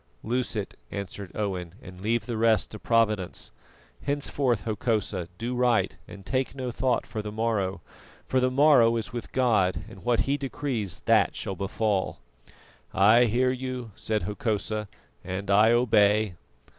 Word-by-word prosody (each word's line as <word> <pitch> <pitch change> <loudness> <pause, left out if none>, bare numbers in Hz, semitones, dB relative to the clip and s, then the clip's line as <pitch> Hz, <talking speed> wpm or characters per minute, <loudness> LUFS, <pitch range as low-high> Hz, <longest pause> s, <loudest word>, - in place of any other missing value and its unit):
"Loose 125 +1 -1
it," 105 -2 -4
answered 100 -1 -6
Owen, 95 -5 -3
"and 90 0 -12
leave 110 +1 0
the 120 - -3
rest 110 -2 +2
to 110 - -7
Providence. 110 -5 0 0.5
Henceforth, 140 -6 0
Hokosa, 105 -5 -1
do 120 +2 -3
right, 125 -1 +2
and 100 -1 -11
take 130 0 -1
no 130 -2 -3
thought 125 +1 0
for 110 -1 -5
the 105 0 -6
morrow, 105 -3 -1 0.4
for 130 - +1
the 130 0 +2
morrow 130 -4 +5
is 115 +1 -4
with 120 -2 -6
God, 110 -8 +2
and 95 - -12
what 120 -1 +2
He 140 +1 0
decrees, 130 -9 -3
that - - +4
shall 95 - -4
befall." 100 +1 -1 0.8
"I 110 +5 +6
hear 125 +3 +2
you," 130 -2 -5
said 110 -1 -1
Hokosa, 105 0 -2 0.4
"and 95 +2 -4
I 105 +3 +6
obey." 105 -4 +3
110 Hz, 150 wpm, -27 LUFS, 100-125 Hz, 0.8 s, I